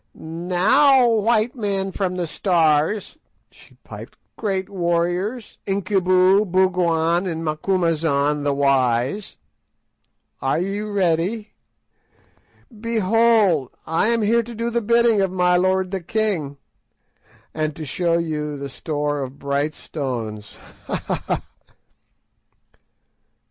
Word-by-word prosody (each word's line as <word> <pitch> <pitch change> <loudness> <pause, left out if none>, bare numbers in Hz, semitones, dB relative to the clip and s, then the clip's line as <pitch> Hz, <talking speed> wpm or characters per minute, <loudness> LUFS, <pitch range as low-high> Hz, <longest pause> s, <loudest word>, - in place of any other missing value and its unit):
"Now, 185 - +3
white 225 +1 +2
men 195 -4 -2
from 185 -1 -2
the 180 -1 -2
Stars," 165 - +1 0.3
she - - -20
piped; - - -11 0.2
"great 195 -3 -2
warriors, 180 +5 -2
Incubu, 190 0 +3
Bougwan, 175 -1 +2
and 165 -2 -4
Macumazahn 155 -3 0
the 145 - +1
wise, 135 - +1 1.0
are 135 +2 +1
ye 195 +4 -2
ready? 205 +1 -1 1.3
Behold, 220 - +2 0.2
I 165 +6 +1
am 230 -1 +1
here 230 +3 +3
to 235 +1 -9
do 230 +2 -2
the 235 0 0
bidding 235 -1 +3
of 195 - +1
my 180 -1 +2
lord 185 +1 +1
the 195 -2 -3
king, 170 -7 -2 1.0
and 155 -1 -2
to 160 - -7
show 170 +4 0
you 150 -3 -3
the 140 0 -6
store 145 +1 -3
of 135 +1 -6
bright 140 +2 -2
stones. 115 -8 -5 0.3
_Ha! - - -2
ha! - - -4
ha! - - -1
180 Hz, 110 wpm, -21 LUFS, 155-205 Hz, 1.3 s, Now